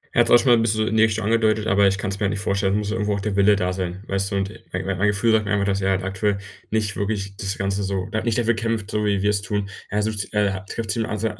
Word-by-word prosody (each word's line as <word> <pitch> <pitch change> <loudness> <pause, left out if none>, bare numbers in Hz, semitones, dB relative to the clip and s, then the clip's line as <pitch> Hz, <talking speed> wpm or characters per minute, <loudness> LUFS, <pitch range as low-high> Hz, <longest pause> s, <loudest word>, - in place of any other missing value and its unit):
Er - - +3
hat - - +5
es - - 0
auch 120 - +9
schon 125 - +1
mal 120 - +7
'n - - +2
bisschen 110 -1 +1
so - - +2
in 110 - -1
die 110 - +5
Richtung 110 -1 +1
schon 110 +2 +1
angedeutet, 110 -1 +2
aber 100 -1 +4
ich 95 0 +1
kann 100 -1 -3
es 100 - -5
mir 105 - 0
halt - - +2
nicht 100 0 -2
vorstellen. 100 -1 0
Es - - +2
muss 105 -1 -2
ja 110 - -1
irgendwo 105 -2 0
auch - - -3
der 100 0 -2
Wille 100 +1 +5
da 90 -2 -1
sein, 95 0 -4
weißt 95 0 -1
du? - - -1
Und 100 0 -1 0.2
mein 90 +1 -3
mein 95 +1 0
Gefühl 105 +3 +2
sagt 110 -1 +3
mir 100 - -3
einfach, 100 -1 +1
dass 100 0 0
er 95 - +1
halt 95 -1 0
aktuell 100 +1 -1 0.3
nicht 105 -2 -1
wirklich 100 -1 -3
das 100 0 -3
Ganze 100 0 -1
so 95 -1 -2
da 110 - -1
nicht 115 -3 0
dafür 120 -1 +2
kämpft, 115 -2 -2
so 105 0 0
wie 100 -2 +1
wir 105 - +3
es 100 -1 0
tun. 100 0 -3 0.2
Er 105 +1 0
sucht, 105 -2 -3
äh 105 -1 +2 0.2
trifft 115 -2 -3
sich 115 0 -1
zum 105 0 -3
100 Hz, 335 wpm, -22 LUFS, 100-110 Hz, 0.3 s, auch